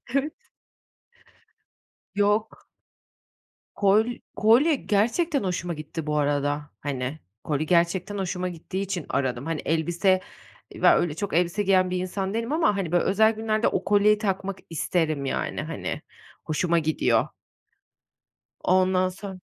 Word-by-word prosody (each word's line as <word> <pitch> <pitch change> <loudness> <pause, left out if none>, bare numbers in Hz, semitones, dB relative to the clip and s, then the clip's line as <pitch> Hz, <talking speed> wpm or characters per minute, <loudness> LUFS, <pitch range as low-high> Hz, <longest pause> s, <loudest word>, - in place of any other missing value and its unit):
Evet. 295 +3 -2 1.7
Yok. 210 +2 0 1.1
Kol 205 +2 +4 0.3
kolye 250 +9 +4
gerçekten 260 - +1
hoşuma 175 -2 -2
gitti, 155 0 -6
bu 150 0 0
arada. 145 0 0
Hani, 135 +1 -4 0.2
kolye 150 0 -1
gerçekten 180 +4 +1
hoşuma 185 -1 -2
gittiği 180 +3 -5
için 190 -4 -3
aradım. 130 -1 -1
Hani, 165 -2 -2
elbise, 175 +4 +2 0.5
ya - - +5
öyle 170 -4 0
çok 200 +2 -4
elbise 175 +4 +1
giyen 185 -2 +3
bir 180 - -1
insan 190 +2 -3
değilim 230 +4 -2
ama, 315 -9 +2
hani, 180 -5 -2
böyle, 175 - +3
özel 220 +3 +4
günlerde 220 0 0
o - - 0
kolyeyi 210 +1 +4
takmak 195 -2 -2
isterim 155 -3 -1
yani. - - -2
Hani, - - -5 0.4
hoşuma 170 +2 +1
gidiyor. 155 0 +1 1.4
Ondan 185 0 +3
sonra 190 0 -8
185 Hz, 125 wpm, -25 LUFS, 160-205 Hz, 1.7 s, ya